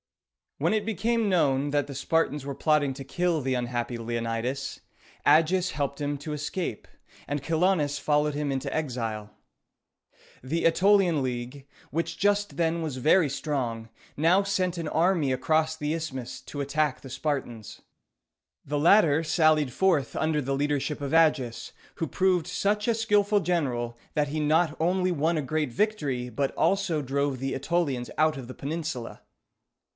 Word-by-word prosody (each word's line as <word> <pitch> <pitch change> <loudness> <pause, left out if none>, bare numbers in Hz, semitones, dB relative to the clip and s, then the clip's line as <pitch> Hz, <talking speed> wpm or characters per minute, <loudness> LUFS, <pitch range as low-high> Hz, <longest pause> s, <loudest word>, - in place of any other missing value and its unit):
When - - +1
it 215 -2 0
became 225 +1 0
known 145 -6 +2
that 145 -1 +1
the 140 - -7
Spartans 150 0 0
were 140 -1 -4
plotting 150 -2 +2
to 135 - -7
kill 170 +3 0
the 130 0 -1
unhappy 120 -1 -2
Leonidas, 115 +3 -3 0.5
Agis 180 +3 +4
helped 140 0 -3
him 145 0 -1
to 150 +2 -5
escape, 150 - -4 0.4
and 145 +1 -2
Chilonis 160 -2 +1
followed 150 0 +1
him 145 -1 -1
into 135 -1 -3
exile. 115 -8 -3 1.1
The 160 +6 -2
Ætolian 180 -2 +4
League, 125 +2 -5 0.2
which 165 +2 -2
just 205 +2 +1
then 165 0 +1
was 150 -5 -4
very 155 +4 +4
strong, 125 -6 -3 0.3
now 170 +6 +4
sent 185 -3 -1
an 165 -2 -3
army 165 -3 +2
across 155 +4 +1
the 150 0 -2
isthmus 130 -6 -5
to 145 +2 -6
attack 145 0 0
the 135 - -10
Spartans. 130 -5 -4 0.8
The 145 +1 -1
latter 160 -2 +5
sallied 155 -4 +3
forth 175 -9 +1
under 155 -1 0
the 135 0 -1
leadership 145 +1 -1
of 140 0 -3
Agis, 140 -8 +2 0.2
who 165 - -2
proved 185 +1 +1
such 205 +4 0
a 230 - +3
skillful 210 -2 +2
general, 125 -11 -1 0.2
that 150 -1 +2
he 155 +2 -2
not 155 +1 +2
only 180 +2 +1
won 165 +1 +1
a 150 - -1
great 150 -1 -1
victory, 140 - -1
but 135 +4 -1
also 195 -6 +1
drove 140 0 -1
the 135 +1 -2
Ætolians 135 -4 -1
out 155 -1 +3
of 130 -3 -7
the 130 - -9
peninsula. 150 -5 -5
150 Hz, 155 wpm, -27 LUFS, 135-170 Hz, 1.1 s, latter